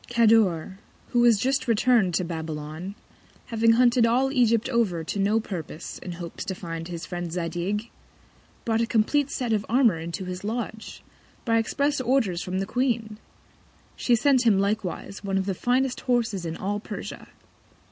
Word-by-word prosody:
Cador, 215 -6 +3 0.3
who 240 - +1
was 240 -2 +6
just 265 +6 0
return'd 225 -5 +3
to 185 - +1
Babylon, 160 +2 -5 0.5
having 230 0 +3
hunted 245 0 +4
all 250 +4 +3
Egypt 235 -4 +3
over 225 -10 0
to 185 +5 -4
no 205 +3 +3
Purpose, 175 -6 -6
in 180 - -6
Hopes 170 -1 -7
to 190 -2 -3
find 165 -2 -6
his 170 -1 -6
Friend 175 -2 -5
Zadig, 180 +6 -3 0.7
brought 225 -1 +1
a 230 - +1
compleat 265 +6 +2
set 245 -5 -1
of 210 -2 +1
Armour 230 -8 +4
into 170 +3 -5
his 180 +1 -6
Lodge, 220 0 -5 0.4
by 230 -1 +3
express 280 +5 0
Orders 235 -9 +1
from 185 0 -3
the 195 - -1
Queen: 230 -2 -1 0.8
She 245 - +2
sent 260 +1 +3
him 220 -5 +4
likewise 200 -1 -2
One 195 -1 -1
of 190 - 0
the 195 - -1
finest 250 +6 0
Horses 230 -8 0
in 165 - -4
all 205 +2 -2
Persia. - - -7
215 Hz, 165 wpm, -25 LUFS, 180-240 Hz, 0.8 s, was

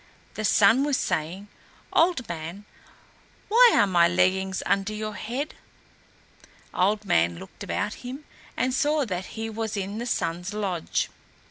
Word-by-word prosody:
The 215 - -5
Sun 215 +6 +5
was 285 -2 +1
saying, 170 +6 -2 0.5
"Old 330 -7 +3
Man, 170 +4 -6 0.8
why 470 +2 +7
are - - +5
my 175 -3 +4
leggings 185 +2 +1
under 200 +1 0
your 215 0 -4
head?" 255 +9 -4 1.2
Old 205 +3 +1
Man 85 - +2
looked 95 - -10
about 205 +2 -2
him 255 +4 -7 0.3
and 255 0 +1
saw 295 +2 +2
that 185 -4 -3
he 225 0 -3
was 220 -1 -4
in 200 +2 -3
the 240 - -4
Sun's 180 -2 -2
lodge. 190 -5 -1
205 Hz, 140 wpm, -26 LUFS, 185-240 Hz, 1.2 s, why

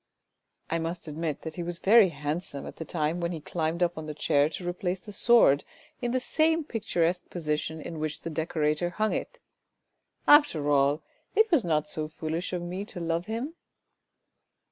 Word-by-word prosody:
" - - -47
I 165 - +1
must 165 +1 -3
admit 155 -1 -3
that 160 - -5
he - - -2
was 175 0 -3
very 205 +1 +6
handsome 150 -1 -4
at - - -9
the 160 - -5
time 160 0 -1
when 170 0 -1
he 165 - -4
climbed 160 +2 -1
up 175 -1 0
on 155 - -7
the 150 - -5
chair 145 0 +3
to 175 +2 -6
replace 180 +1 -2
the 210 - -11
sword 205 - +5 0.4
in 240 - 0
the 255 +2 +1
same 320 +4 +2
picturesque 180 - -1
position 160 -1 -2
in 160 +1 -6
which 155 0 -3
the 165 - -5
decorator 155 +1 0
hung 215 +5 0
it! - - -4 0.9
After 170 - +5
all 140 +2 +3 0.3
it 440 0 +4
was 310 -9 +5
not 155 -3 +1
so 155 0 -3
foolish 160 +2 -4
of 180 -1 -2
me 180 +3 -4
to 200 - -8
love 170 +1 -1
him." 235 +8 -3
170 Hz, 190 wpm, -28 LUFS, 155-190 Hz, 0.9 s, very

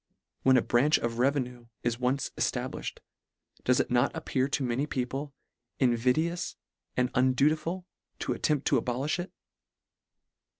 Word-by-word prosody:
When 130 -1 +5
a 120 - +3
branch 140 +6 +4
of 115 0 -3
revenue 125 -3 0 0.2
is 120 0 0
once 130 +2 0
established, - - -2 0.6
does 125 0 +3
it - - 0
not 125 +2 +4
appear 130 0 0
to 140 0 -1
many 130 +4 0
people 135 +2 -3 0.5
invidious 130 +8 +1 0.4
and 125 0 +2
undutiful, 155 +8 +2 0.3
to - - -1
attempt 150 -3 0
to 135 -5 +3
abolifh 130 +8 -1
it 175 - -4
130 Hz, 130 wpm, -29 LUFS, 125-145 Hz, 0.6 s, When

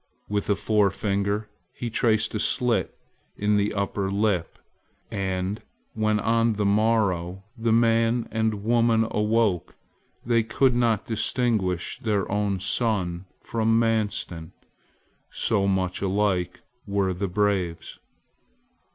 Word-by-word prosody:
With 105 0 -2
a 100 - +4
forefinger 100 0 0 0.3
he 120 -1 -5
traced 110 -1 +1
a 105 - -1
slit 125 +2 0 0.4
in 105 0 +1
the 100 0 +1
upper 100 -1 -1
lip; 100 -3 0 0.5
and 95 +1 -2 0.3
when 110 -1 +1
on 115 +1 +2
the 105 0 -1
morrow 100 -4 +1
the 115 -1 0
man 115 +1 +3
and 110 -2 -1
woman 115 0 +3
awoke 105 -4 +1 0.5
they 115 -1 +3
could 125 +3 +2
not 115 -4 +1
distinguish 110 -5 -1
their 105 -4 0
own 100 -1 0
son 95 -4 -1 0.2
from 115 0 +1
Manstin, 105 -7 -1 0.8
so 100 -4 0
much 95 -2 0
alike 95 -2 0 0.3
were 100 -2 0
the 100 +3 -2
braves. 95 -3 -1
105 Hz, 115 wpm, -25 LUFS, 95-115 Hz, 0.8 s, a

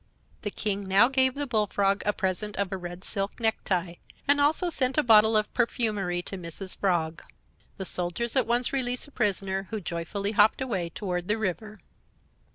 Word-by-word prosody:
The 205 - -3
King 200 -1 -3
now 195 +6 +5
gave 260 -1 +3
the 290 0 -2
Bullfrog 205 -4 +1
a - - +5
present 195 +2 -2
of 200 -1 -1
a - - -1
red 175 0 -7
silk 195 +1 -4
necktie, 185 -6 0 0.3
and 285 0 +5
also 320 +5 +2
sent 260 -3 0
a 300 - +4
bottle 220 -2 +6
of 215 0 -1
perfumery 210 -7 0
to 195 - -6
Mrs. 180 +2 -5
Frog. 165 -4 0 0.6
The 190 - -5
soldiers 180 +7 -1
at 260 -3 +3
once 240 +2 +1
released 250 -2 0
the 290 - -14
prisoner, 195 -4 -1
who 220 - -3
joyfully 180 +3 -3
hopped 210 0 +4
away 195 -10 -2
toward 180 0 -4
the 210 - +1
river. 215 +1 -3
205 Hz, 175 wpm, -27 LUFS, 185-235 Hz, 0.6 s, bottle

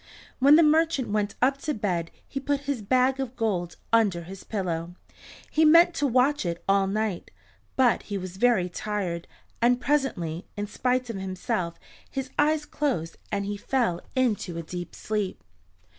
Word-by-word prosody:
When 280 +3 +7
the 330 - +7
merchant 315 -3 +3
went 205 -1 -1
up 270 +2 +3
to 300 0 -2
bed 175 -6 -1 0.2
he 275 - -4
put 280 +1 -1
his 280 -4 -2
bag 255 +5 +2
of 260 -2 -3
gold 190 -7 -1 0.2
under 200 -7 +3
his 190 +3 -10
pillow. 175 -4 -3 0.6
He 315 - +3
meant 335 +3 +7
to 290 - +1
watch 265 +4 +3 0.2
all 195 0 +3
night, 210 -2 -2 0.5
but 255 -3 +3
he 200 - -1
was 185 -1 -7
very 225 -5 +3
tired, 180 -3 -3 0.3
and 245 +1 +4
presently, 200 - -1
in 205 - -1
spite 250 +3 -1
of 215 - -6
himself 185 -2 -3 0.3
his 265 -1 -4
eyes 300 0 +3
closed 255 - -2
and 200 - -1
he 205 0 -3
fell 225 -6 0
into 215 -9 0
a 170 - -4
deep 175 +2 -7
sleep. 210 -3 -2
220 Hz, 160 wpm, -26 LUFS, 185-270 Hz, 0.6 s, When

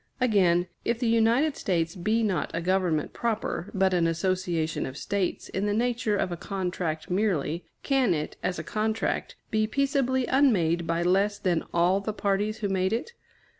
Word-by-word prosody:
Again, 185 -8 +3 0.2
if 235 - 0
the 245 - -2
United 230 +6 +3
States 165 -3 -1
be 215 +5 +1
not 190 -7 0
a - - 0
government 180 -3 0
proper, 220 -5 -2
but 190 -1 +2
an 170 -2 +3
association 170 -1 -1
of 130 +1 -8
States 195 -2 -2
in 195 +2 -1
the 205 - +1
nature 235 -2 0
of 185 - -1
a 175 - -3
contract 180 -4 -3
merely, 175 -5 0 0.2
can 260 -10 +2
it, 150 0 -4
as 180 - -1
a - - -4
contract, 220 +1 -1 0.2
be 215 0 +2
peaceably 265 0 +1
unmade 175 - +2
by 165 +1 0
less 195 +3 +2
than 180 -5 0
all 175 +3 +3
the 210 +2 -3
parties 205 +1 -1
who 205 - 0
made 190 +1 0
it? 355 - -3
195 Hz, 170 wpm, -27 LUFS, 175-220 Hz, 0.2 s, Again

